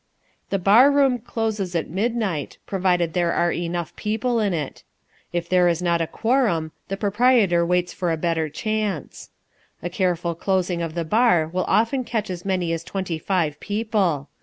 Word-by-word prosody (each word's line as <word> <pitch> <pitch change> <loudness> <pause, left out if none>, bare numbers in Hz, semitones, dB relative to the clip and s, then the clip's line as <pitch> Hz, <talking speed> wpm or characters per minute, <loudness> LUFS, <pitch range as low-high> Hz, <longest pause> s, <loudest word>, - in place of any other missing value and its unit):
The 195 - +1
bar 210 +9 +6
room 275 -3 +3
closes 215 -5 -3
at 165 - 0
midnight, 200 - -2
provided 180 -4 +1
there 175 -1 +1
are 175 0 +2
enough 170 -1 -3
people 225 +3 -1
in 210 -2 +1
it. 155 -6 -4 0.5
If 175 -1 -2
there 180 0 +4
is 170 -1 +1
not 170 -1 +1
a 165 - 0
quorum 220 -11 0 0.2
the 195 - -3
proprietor 205 -3 +3
waits 180 +1 0
for 175 -3 -1
a 165 - 0
better 160 -1 -1
chance. 210 +2 -3 0.5
A 175 - -3
careful 175 -2 0
closing 180 0 -1
of 165 -1 -4
the 170 -1 -2
bar 180 -4 +3
will 185 0 0
often 240 +4 +2
catch 215 -5 -3
as 180 -1 -6
many 180 -3 0
as 165 0 -3
twenty 180 -3 -4
five 160 -4 -1
people. 205 -9 -1
180 Hz, 170 wpm, -23 LUFS, 170-215 Hz, 0.5 s, bar